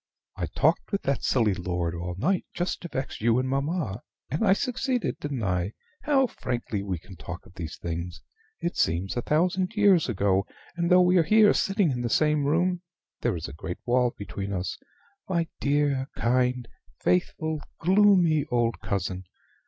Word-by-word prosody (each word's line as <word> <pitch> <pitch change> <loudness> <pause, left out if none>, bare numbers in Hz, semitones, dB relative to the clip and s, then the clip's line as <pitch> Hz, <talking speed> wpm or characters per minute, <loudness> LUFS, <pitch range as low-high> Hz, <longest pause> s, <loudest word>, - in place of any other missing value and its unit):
I - - -3
talked - - +1
with 200 - -1
that 140 - 0
silly 115 -6 +2
lord 90 -2 -2
all 85 +1 -4
night 180 - +1
just 175 +1 -2
to 175 - -5
vex 135 -8 -5
you 115 +1 +3
and 130 +1 0
mamma, 140 - -1 0.3
and 150 +9 0
I 195 -3 +5
succeeded, 250 +2 -1
didn't 140 -5 -3
I? 90 +1 -1 0.3
How 275 -3 +3
frankly 120 - -3
we 95 -2 -3
can 95 +4 -13
talk 90 0 -8
of - - -17
these 85 -5 -6
things! 85 +1 -5 0.4
It 170 - -2
seems 85 +6 0
a 120 - 0
thousand 180 - +1
years 200 - +4
ago: 100 -3 +1 0.3
and, 170 -1 0
though 180 0 +7
we 180 +1 +4
are 170 - +5
here 210 +5 +5
sitting 195 -5 +2
in 125 -2 -2
the 120 - -1
same 150 +3 +2
room, 175 +4 +1 0.4
there - - +1
is - - -5
a - - -9
great 90 +3 -6
wall 125 0 +2
between 100 -1 -5
us. 95 -1 -2 0.5
My 170 -3 +1
dear, 140 -2 +1
kind, 125 0 +1 0.3
faithful, 105 - 0 0.2
gloomy 180 -5 +4
old 120 -1 +1
cousin! 95 -1 -3
130 Hz, 175 wpm, -27 LUFS, -, 0.5 s, though